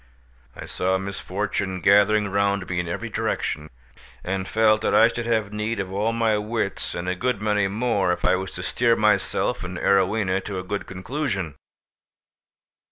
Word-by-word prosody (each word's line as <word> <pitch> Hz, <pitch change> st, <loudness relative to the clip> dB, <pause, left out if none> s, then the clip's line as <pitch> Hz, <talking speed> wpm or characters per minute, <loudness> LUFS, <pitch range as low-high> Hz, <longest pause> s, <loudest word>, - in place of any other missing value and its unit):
I -, -, -8 dB
saw 95 Hz, +1 st, 0 dB
misfortune 95 Hz, 0 st, -3 dB
gathering 105 Hz, +3 st, +4 dB
round 100 Hz, -1 st, 0 dB
me 90 Hz, -1 st, -2 dB
in 85 Hz, -, -2 dB
every 85 Hz, -, -4 dB
direction, 75 Hz, +1 st, -2 dB, 0.5 s
and 95 Hz, +1 st, -2 dB
felt 110 Hz, -1 st, +3 dB
that -, -, +1 dB
I 115 Hz, -, +7 dB
should 120 Hz, 0 st, -4 dB
have 110 Hz, -3 st, 0 dB
need 105 Hz, +1 st, -2 dB
of 95 Hz, -1 st, -3 dB
all 105 Hz, +3 st, +1 dB
my 115 Hz, -2 st, +1 dB
wits 105 Hz, -2 st, -3 dB
and 85 Hz, +1 st, -4 dB
a 90 Hz, -, +1 dB
good 120 Hz, +3 st, -1 dB
many 105 Hz, -1 st, +1 dB
more, 105 Hz, -2 st, 0 dB
if 90 Hz, 0 st, -2 dB
I -, -, +4 dB
was 95 Hz, +1 st, -3 dB
to 90 Hz, -, -6 dB
steer 115 Hz, +6 st, +2 dB
myself 105 Hz, -3 st, +1 dB
and 90 Hz, 0 st, -5 dB
Arowhena 95 Hz, 0 st, +2 dB
to 100 Hz, -2 st, -4 dB
a 90 Hz, -, -4 dB
good 100 Hz, +2 st, -4 dB
conclusion. 95 Hz, -, -3 dB
100 Hz, 170 wpm, -24 LUFS, 95-110 Hz, 0.5 s, I